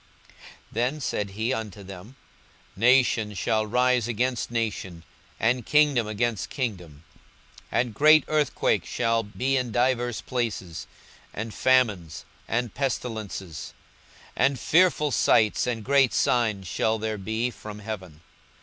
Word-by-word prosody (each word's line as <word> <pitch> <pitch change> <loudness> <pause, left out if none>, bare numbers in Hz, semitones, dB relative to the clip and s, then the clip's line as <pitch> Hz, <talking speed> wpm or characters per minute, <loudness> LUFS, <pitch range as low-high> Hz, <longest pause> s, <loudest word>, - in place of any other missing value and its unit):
42:021:010 - - -24 0.3
Then 125 +7 -1
said 105 -6 -2
he 110 +6 -2
unto 105 -4 -5
them, 95 +6 -11 0.6
Nation 115 -2 +3
shall 110 +3 0
rise 125 0 +2
against 120 +2 -1
nation, 105 -7 -3 0.4
and 120 +2 +1
kingdom 145 -4 +3
against 110 -1 -2
kingdom: 90 - -5 0.7
42:021:011 - - +3
And 120 -3 -9
great 155 +6 +6
earthquakes 150 -2 0
shall 115 0 +1
be 125 +5 -1
in 125 -2 -2
divers 120 0 0
places, 110 -9 -4 0.5
and 110 +1 -5
famines, 105 - +1 0.2
and 120 -1 -1
pestilences; 110 - -4 0.6
and 135 -2 +2
fearful 160 -1 +3
sights 110 -1 +3
and 115 -3 -3
great 140 -2 +3
signs 110 -5 +1
shall 110 +5 0
there 110 -1 -3
be 110 +5 -2
from 105 -2 -9
heaven. 95 -7 -8
115 Hz, 125 wpm, -25 LUFS, 105-125 Hz, 0.7 s, great